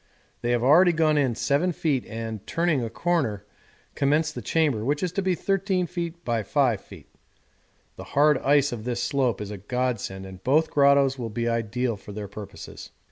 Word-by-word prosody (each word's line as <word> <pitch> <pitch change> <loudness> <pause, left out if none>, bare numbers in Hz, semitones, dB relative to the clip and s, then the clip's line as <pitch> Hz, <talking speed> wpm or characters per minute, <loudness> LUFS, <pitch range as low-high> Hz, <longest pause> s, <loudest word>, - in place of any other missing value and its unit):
They 120 - -2
have 120 -1 +1
already 170 +7 +6
gone 155 -1 +2
in 130 -5 +1
7 145 +9 +1
feet 145 -6 -1
and, 110 -2 -6
turning 165 -6 +1
a 115 - -3
corner, 115 - -1 0.5
commenced 150 +3 +1
the - - -6
chamber, 145 -10 +1
which 145 +6 -1
is 180 - -1
to 195 - -1
be 185 -1 +1
13 195 -1 0
feet 170 0 -5
× 115 -2 0
5 125 -8 +2
feet. - - -14 0.9
The - - -7
hard 150 -1 +3
ice 145 0 +3
of 115 -3 -5
this 120 0 -2
slope 135 -5 0
is 105 0 -6
a 105 - -6
godsend 110 -4 -3
and 95 0 -11
both 155 +6 +2
grottoes 140 -1 +4
will 115 -2 -3
be 115 +2 -2
ideal 115 0 -1
for 100 +1 -11
their 105 0 -5
purposes. 100 0 -10
135 Hz, 190 wpm, -25 LUFS, 115-155 Hz, 0.9 s, already